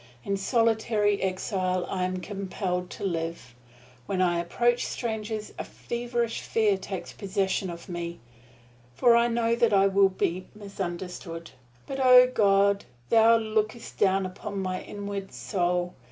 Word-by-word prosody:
In 200 Hz, -, -1 dB
solitary 220 Hz, -1 st, +1 dB
exile 185 Hz, -1 st, -1 dB
I 185 Hz, -1 st, -1 dB
am 185 Hz, 0 st, -3 dB
compelled 185 Hz, -2 st, -3 dB
to -, -, -8 dB
live. 165 Hz, -8 st, -3 dB, 0.5 s
When 190 Hz, -, -1 dB
I 175 Hz, -2 st, +2 dB
approach 240 Hz, +8 st, +1 dB
strangers 220 Hz, -2 st, -4 dB
a -, -, -2 dB
feverish 235 Hz, -1 st, -3 dB
fear 215 Hz, -3 st, +2 dB
takes 190 Hz, -2 st, -6 dB
possession 195 Hz, -1 st, -1 dB
of 170 Hz, 0 st, -8 dB
me, 170 Hz, -1 st, -5 dB, 0.8 s
for 235 Hz, -, +5 dB
I 235 Hz, 0 st, +4 dB
know 230 Hz, -1 st, +1 dB
that 235 Hz, -2 st, +2 dB
I 195 Hz, 0 st, +5 dB
will 195 Hz, 0 st, +4 dB
be 185 Hz, -1 st, -2 dB
misunderstood. 180 Hz, -4 st, -6 dB, 0.3 s
But 270 Hz, -, -5 dB
O 250 Hz, -1 st, +9 dB
God, 200 Hz, -4 st, +3 dB, 0.2 s
Thou 230 Hz, 0 st, +6 dB
lookest 220 Hz, +1 st, -2 dB
down 195 Hz, 0 st, +3 dB
upon 200 Hz, +2 st, -6 dB
my 185 Hz, -1 st, -2 dB
inward 200 Hz, -1 st, -6 dB
soul! 180 Hz, -2 st, -1 dB
195 Hz, 140 wpm, -27 LUFS, 185-220 Hz, 0.8 s, O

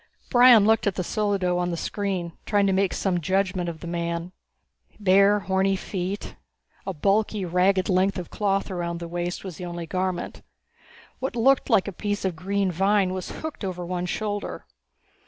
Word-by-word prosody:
Brion 245 Hz, -4 st, +7 dB
looked 220 Hz, 0 st, +3 dB
at 200 Hz, -, 0 dB
the 180 Hz, -, -2 dB
solido 190 Hz, -3 st, 0 dB
on 175 Hz, 0 st, 0 dB
the 170 Hz, -, -3 dB
screen, 190 Hz, -3 st, -3 dB, 0.2 s
trying 205 Hz, -1 st, +3 dB
to 195 Hz, -, +2 dB
make 195 Hz, 0 st, +2 dB
some 185 Hz, -3 st, 0 dB
judgment 185 Hz, 0 st, 0 dB
of 160 Hz, -2 st, -8 dB
the -, -, -7 dB
man. 170 Hz, 0 st, -3 dB, 0.7 s
Bare, 200 Hz, +1 st, +4 dB
horny 190 Hz, 0 st, +1 dB
feet. 190 Hz, +1 st, -4 dB, 0.5 s
A -, -, 0 dB
bulky, 200 Hz, +4 st, +1 dB
ragged 185 Hz, +2 st, +2 dB
length 190 Hz, +1 st, +2 dB
of 180 Hz, -2 st, -6 dB
cloth 195 Hz, -1 st, 0 dB
around 170 Hz, -2 st, -3 dB
the 170 Hz, -, -6 dB
waist 175 Hz, +1 st, -4 dB
was 185 Hz, -5 st, -7 dB
the 180 Hz, -, -6 dB
only 175 Hz, -1 st, -5 dB
garment. 185 Hz, +1 st, -3 dB, 0.8 s
What 265 Hz, -2 st, -3 dB
looked 260 Hz, +3 st, +3 dB
like 195 Hz, -, +3 dB
a -, -, -2 dB
piece 205 Hz, +2 st, -3 dB
of 185 Hz, -3 st, -1 dB
green 195 Hz, +2 st, -1 dB
vine 195 Hz, +1 st, +2 dB
was 185 Hz, -1 st, -5 dB
hooked 315 Hz, -7 st, -7 dB
over 180 Hz, -2 st, -4 dB
one 180 Hz, 0 st, -3 dB
shoulder. 205 Hz, +2 st, -3 dB
190 Hz, 175 wpm, -25 LUFS, 175-200 Hz, 0.8 s, Brion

